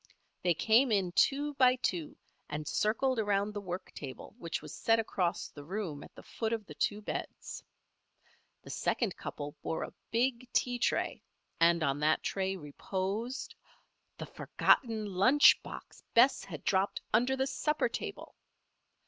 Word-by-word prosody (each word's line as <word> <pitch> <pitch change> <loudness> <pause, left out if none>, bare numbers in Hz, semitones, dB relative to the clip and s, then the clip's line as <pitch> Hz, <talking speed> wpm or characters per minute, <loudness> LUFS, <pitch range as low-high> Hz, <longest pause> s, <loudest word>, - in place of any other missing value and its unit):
They 175 -2 +2
came 230 - +4
in 195 -4 +2
two 285 +9 +2
by 255 -2 +5
two 175 -10 -2 0.3
and 150 0 -4
circled 230 - +1
around 205 -1 +1
the 205 - -4
work 180 -1 -6
table 135 -3 -8
which 170 -5 -3
was - - -10
set 225 0 +3
across 185 -6 -1
the 145 - -11
room 170 -3 -4
at - - -14
the - - -12
foot 225 0 -3
of 220 -2 -3
the 150 - -10
two 205 +7 -1
beds. - - -5 1.0
The - - -9
second 225 -7 0
couple 145 0 -6
bore 160 - -2
a - - -7 0.2
big 245 +1 0
tea 245 -1 +1
tray - - 0 0.4
and 170 0 +4
on 140 -1 +1
that 155 +1 +2
tray 190 0 -1
reposed 195 - -4 0.6
_the - - -6
forgotten 225 -4 +2
lunch 205 +10 +6
box - - -10
Bess 255 +4 +5
had 160 -7 -8
dropped 195 +1 +1
under 250 +4 +3
the 265 - +1
supper 300 +1 0
table! 235 - -6
205 Hz, 155 wpm, -32 LUFS, 170-240 Hz, 1.0 s, lunch